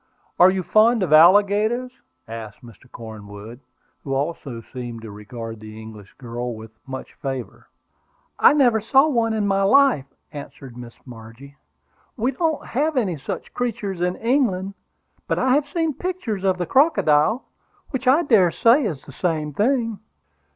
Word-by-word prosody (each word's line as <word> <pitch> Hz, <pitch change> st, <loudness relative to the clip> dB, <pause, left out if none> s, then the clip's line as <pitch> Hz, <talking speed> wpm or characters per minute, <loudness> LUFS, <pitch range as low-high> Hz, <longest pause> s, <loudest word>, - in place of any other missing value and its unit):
Are 180 Hz, -, +8 dB
you 185 Hz, 0 st, -1 dB
fond 220 Hz, +3 st, +3 dB
of 165 Hz, -, 0 dB
alligators?" 205 Hz, +9 st, +4 dB, 0.4 s
asked 110 Hz, +1 st, -9 dB
Mr. 120 Hz, +2 st, -17 dB
Cornwood, 110 Hz, 0 st, -10 dB, 0.4 s
who 135 Hz, -1 st, -3 dB
also 140 Hz, -5 st, -4 dB
seemed 120 Hz, -3 st, -7 dB
to 110 Hz, -, -8 dB
regard 115 Hz, +2 st, -8 dB
the 110 Hz, 0 st, -11 dB
English 110 Hz, -2 st, -12 dB
girl 120 Hz, -1 st, -5 dB
with 110 Hz, 0 st, -11 dB, 0.2 s
much 130 Hz, 0 st, -8 dB
favor. 135 Hz, -3 st, -7 dB, 0.7 s
"I -, -, +7 dB
never 245 Hz, -7 st, +3 dB
saw 270 Hz, +7 st, +4 dB
one 230 Hz, -6 st, +1 dB
in 210 Hz, -2 st, 0 dB
my 195 Hz, 0 st, +1 dB
life," 225 Hz, -, +4 dB, 0.2 s
answered 140 Hz, -3 st, -10 dB
Miss 120 Hz, -1 st, -10 dB
Margie. 120 Hz, +3 st, -13 dB, 0.6 s
"We 245 Hz, +3 st, 0 dB
don't 320 Hz, +3 st, -2 dB
have 295 Hz, +4 st, -1 dB
any 200 Hz, -9 st, 0 dB
such 135 Hz, -, -7 dB
creatures 205 Hz, -7 st, -3 dB
in 180 Hz, +1 st, 0 dB
England. 225 Hz, -6 st, 0 dB, 0.5 s
But -, -, -1 dB
I 255 Hz, 0 st, +2 dB
have 290 Hz, +1 st, +1 dB
seen 325 Hz, 0 st, -1 dB
pictures 310 Hz, -, -4 dB
of 190 Hz, -1 st, +1 dB
the 175 Hz, -, -2 dB
crocodile, 220 Hz, -, +3 dB, 0.5 s
which 265 Hz, -1 st, -4 dB
I 285 Hz, +7 st, +5 dB
dare 210 Hz, -, +4 dB
say 235 Hz, -, +3 dB
is 160 Hz, -, -4 dB
the -, -, -12 dB
same 155 Hz, 0 st, -2 dB
thing." 230 Hz, -, 0 dB
185 Hz, 155 wpm, -22 LUFS, -, 0.7 s, Are